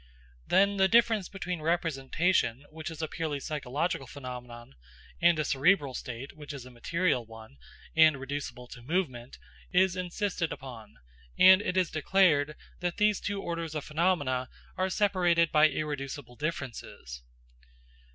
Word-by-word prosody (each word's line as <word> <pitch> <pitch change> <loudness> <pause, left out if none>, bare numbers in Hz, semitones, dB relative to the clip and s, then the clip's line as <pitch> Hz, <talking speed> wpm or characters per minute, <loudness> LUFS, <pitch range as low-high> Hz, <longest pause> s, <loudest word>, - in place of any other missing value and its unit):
Then 200 +1 +3
the 190 0 +5
difference 225 -3 +3
between 180 -4 -4
representation, 155 -4 0
which 160 +1 -6
is 160 -1 -6
a - - 0
purely 155 -2 -3
psychological 145 +1 -2
phenomenon, 125 - -9 0.5
and 170 -1 +5
a 155 - 0
cerebral 140 0 +2
state 125 +2 -6
which 150 -1 -9
is 135 -3 -8
a 130 - -12
material 165 +2 0
one, 110 -8 -13 0.4
and 155 -3 +6
reducible 135 -2 -5
to 120 - -10
movement, 130 -4 -3 0.3
is 185 0 +3
insisted 180 -1 -2
upon; 120 -6 -9 0.4
and 185 +1 +8
it 185 -2 -2
is 185 -2 +2
declared 155 -3 +3 0.2
that 175 -1 -2
these 210 -1 +3
two 200 -1 -3
orders 170 -2 -4
of 150 - -3
phenomena 150 -6 0 0.3
are 185 0 0
separated 175 -5 +2
by 155 +1 +6
irreducible 140 -3 -5
differences. 120 - -6
155 Hz, 140 wpm, -29 LUFS, 130-180 Hz, 0.5 s, and